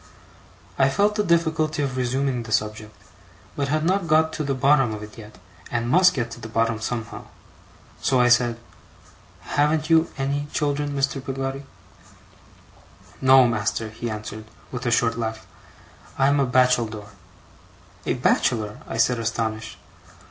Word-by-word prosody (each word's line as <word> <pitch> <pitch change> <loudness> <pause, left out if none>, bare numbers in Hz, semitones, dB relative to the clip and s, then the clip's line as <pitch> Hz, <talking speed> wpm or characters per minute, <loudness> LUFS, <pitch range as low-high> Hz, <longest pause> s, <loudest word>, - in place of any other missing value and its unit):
I 135 - +5
felt 205 +9 +2
the 210 0 0
difficulty 160 -4 +1
of 135 -2 -3
resuming 130 0 -1
the 115 -1 -9
subject, 110 0 -2 0.6
but 140 - -1
had 155 +2 0
not 185 0 +1
got 160 +1 +3
to 155 - -3
the 140 -1 -1
bottom 135 -4 +3
of 105 - -8
it 105 - -11
yet, 105 -4 -12 0.3
and 115 -1 -2
must 180 +7 +5
get 115 -3 -2
to 120 - -8
the 115 - -8
bottom 115 0 0
somehow. 110 -1 -5 0.8
So 130 - +2
I 125 - +5
said: 120 -1 +3 0.8
'Haven't 155 +2 0
you 165 0 +4
ANY 140 +2 -2
children, 145 -1 -1
Mr. 135 0 -1
Peggotty?' 135 +1 -4 1.5
'No, 130 -1 +6
master,' 110 -1 -2
he 115 +2 -5
answered 110 0 -7 0.3
with 125 0 -4
a - - +1
short 115 -1 +1
laugh. 110 -1 -4 0.7
'I'm 140 +1 +3
a 135 - +2
bacheldore.' 120 -5 +1 1.0
'A - - +1
bachelor!' 110 -4 0
I - - -5
said, 120 +1 +2
astonished. 115 -1 -3
125 Hz, 150 wpm, -23 LUFS, 115-145 Hz, 1.5 s, No